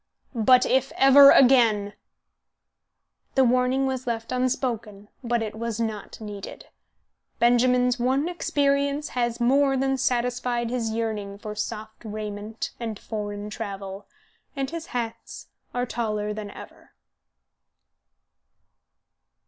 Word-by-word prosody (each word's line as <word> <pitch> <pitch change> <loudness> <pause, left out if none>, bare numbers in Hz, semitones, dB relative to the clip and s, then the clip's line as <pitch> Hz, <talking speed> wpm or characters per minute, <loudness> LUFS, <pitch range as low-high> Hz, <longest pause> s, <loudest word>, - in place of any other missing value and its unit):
But 250 +2 +5
if 265 +1 +1
ever 275 +1 +8
again 230 -7 +5 0.7
" - - -50
The 265 - +5
warning 255 +2 +2
was 260 -1 -3
left 230 -1 -3
unspoken, 235 -5 -2
but 240 -1 0
it 215 - -5
was 230 0 -4
not 220 -3 -4
needed. 205 -2 -8 0.7
Benjamin's 250 +1 +3
one 265 +5 +1
experience 285 -3 0
has 240 -1 -1
more 270 +3 +3
than 270 0 +1
satisfied 245 -1 -1
his 240 -3 -1
yearning 215 -3 -3
for 210 0 -7
soft 215 +1 -6
raiment 215 0 -5
and 225 -3 -4
foreign 205 -1 -5
travel, 200 -2 -6 0.5
and 275 0 -3
his 335 0 -6
hats 230 -2 -6 0.2
are 245 0 -1
taller 210 -3 -2
than 210 -1 -6
ever. - - -13
235 Hz, 115 wpm, -25 LUFS, 215-255 Hz, 0.7 s, ever